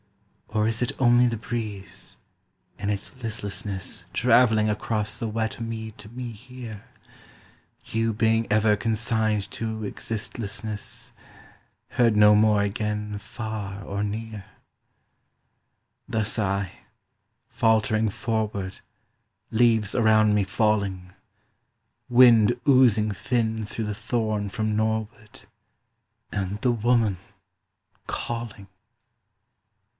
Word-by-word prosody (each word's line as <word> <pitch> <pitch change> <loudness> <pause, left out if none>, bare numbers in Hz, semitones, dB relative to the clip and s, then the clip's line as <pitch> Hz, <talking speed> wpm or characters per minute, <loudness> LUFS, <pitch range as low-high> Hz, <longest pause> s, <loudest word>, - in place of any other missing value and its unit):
Or 110 0 0
is 115 +1 -1
it 125 - +1
only 120 -1 +5
the 115 -1 -1
breeze, 105 -3 -5 0.6
in 100 0 -2
its 105 +6 -3
listlessness 100 -3 -4
Travelling 115 -3 +4
across 105 0 -1
the 115 - -3
wet 110 +1 -2
mead 110 -1 -5
to 105 0 -10
me 120 +1 -6
here, 115 -1 -10 1.0
You 115 0 0
being 115 +1 +2
ever 110 0 +4
consigned 110 -1 0
to 110 -1 -4
existlessness, 105 0 -4 0.8
Heard 115 -3 +3
no 105 0 +7
more 105 -1 +4
again 105 0 -2
far 105 -2 -6
or 100 +1 -3
near? 105 -1 -5 1.6
Thus 110 0 -1
I; 100 -3 0 0.8
faltering 110 -1 +2
forward, 105 -4 -3 0.7
Leaves 110 -3 +3
around 110 -2 +4
me 105 -1 +3
falling, 95 -3 0 1.0
Wind 120 -1 +6
oozing 120 -6 +5
thin 110 +2 -1
through 110 +2 -4
the 105 -1 -3
thorn 110 -2 -1
from 110 +2 -1
norward 110 0 -2 0.9
And 100 +1 -3
the 125 - +3
woman 115 -3 +2 0.9
calling. 115 -4 -5
110 Hz, 100 wpm, -25 LUFS, 105-115 Hz, 1.6 s, no